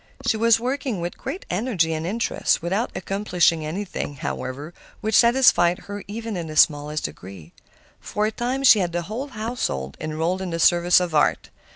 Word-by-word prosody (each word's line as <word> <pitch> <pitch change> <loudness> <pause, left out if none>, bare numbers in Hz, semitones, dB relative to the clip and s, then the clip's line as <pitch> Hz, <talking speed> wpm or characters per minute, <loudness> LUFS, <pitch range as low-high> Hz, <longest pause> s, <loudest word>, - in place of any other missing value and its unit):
She 225 - +2
was 225 0 +4
working 255 -3 -2
with 175 +1 -4
great 370 - -6
energy 180 -5 0
and 160 +1 -3
interest, 225 +5 0
without 195 +8 -1
accomplishing 180 -5 +1
anything, 175 -2 -4
however, 140 +4 -5 0.3
which 220 0 -3
satisfied 235 -8 +5
her 205 0 -7
even 225 +1 -5
in 170 -2 -4
the 155 - -7
smallest 150 0 +3
degree. 85 +2 -8 0.5
For 210 - -2
a 215 - 0
time 250 +4 -2
she 240 -5 +7
had 175 -3 -1
the 175 0 -1
whole 225 - -5
household 215 - -4
enrolled 160 +4 -2
in 190 - -4
the 165 0 -3
service 175 +1 +5
of 180 -2 -3
art. 150 - +1
180 Hz, 175 wpm, -23 LUFS, 160-225 Hz, 0.5 s, she